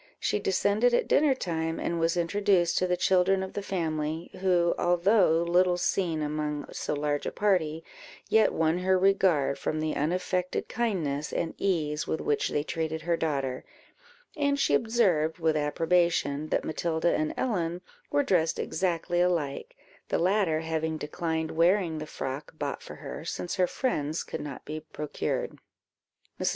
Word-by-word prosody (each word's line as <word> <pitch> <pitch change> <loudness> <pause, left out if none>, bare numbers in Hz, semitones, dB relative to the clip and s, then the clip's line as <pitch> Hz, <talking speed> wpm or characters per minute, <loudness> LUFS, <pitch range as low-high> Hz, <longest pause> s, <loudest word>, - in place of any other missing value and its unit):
She - - 0
descended 205 +5 +2
at - - +1
dinner 290 -3 +4
time, 165 -6 -2
and 170 - -2
was 165 +1 +1
introduced 175 0 +2
to 185 - +1
the 180 0 +1
children 190 +1 +3
of 190 - -7
the 205 - -3
family, 160 -4 -3
who, 175 -2 +3
although 175 -1 +3
little 175 +1 +3
seen 170 -3 0
among 150 0 -2
so - - -3
large 145 0 -1
a - - -2
party, 165 -6 +1 0.4
yet 220 - +4
won 160 +2 +1
her 185 +1 +3
regard, 185 -7 +2
from 155 - -2
the 155 0 -1
unaffected 180 +3 -1
kindness 160 -11 -1
and 165 - -2
ease 155 -6 0
with 160 - -1
which 145 - 0
they 145 - 0
treated 160 0 -3
her 170 0 +1
daughter; 135 -6 -2 0.7
and 285 -2 +1
she 145 - +2
observed, 180 -5 +2
with 160 -2 +1
approbation, 155 -1 +1
that - - 0
Matilda 160 +1 0
and 155 0 0
Ellen 175 -7 -1 0.3
were 290 0 +2
dressed 170 -9 +1
exactly 175 0 -1
alike; 165 -6 -1 0.3
the - - +1
latter 180 -3 +2
having 160 0 -2
declined 160 +1 -3
wearing 170 0 +2
the 155 - -6
frock 140 +2 -6
bought 145 -2 -3
for - - -9
her, 145 +1 -7
since 175 +3 -4
her 180 -1 +3
friend's 155 - -1
could - - -6
not 140 -3 -7
be 155 +1 -5
procured. 150 -1 -4 0.8
Mrs. - - +1
165 Hz, 160 wpm, -28 LUFS, 155-185 Hz, 0.8 s, dinner